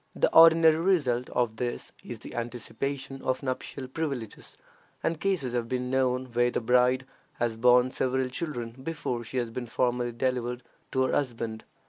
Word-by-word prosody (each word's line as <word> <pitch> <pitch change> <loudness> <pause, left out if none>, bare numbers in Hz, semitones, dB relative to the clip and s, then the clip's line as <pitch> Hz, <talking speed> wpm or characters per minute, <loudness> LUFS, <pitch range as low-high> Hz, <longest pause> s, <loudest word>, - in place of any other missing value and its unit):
The - - +2
ordinary 165 -1 +8
result 145 -9 +1
of 115 -3 0
this 120 0 -3
is 120 - -7
the - - -10
anticipation 135 +3 -4
of 130 +2 -1
nuptial 130 0 -4
privileges, 135 -6 -5 0.5
and 165 -1 0
cases 170 -11 0
have 120 -1 -1
been 125 0 -2
known 130 -1 +1
where 120 +1 +3
the - - -1
bride 125 +2 +3 0.3
has 120 -1 -1
borne 125 +2 +5
several 130 0 0
children 125 -5 -4
before 130 -5 -3
she 125 +3 -6
has 120 -2 -1
been 120 +1 -5
formally 120 0 0
delivered 125 0 -2 0.3
to 130 - +3
her 130 - 0
husband. 115 -5 -2
125 Hz, 160 wpm, -28 LUFS, 120-135 Hz, 0.5 s, ordinary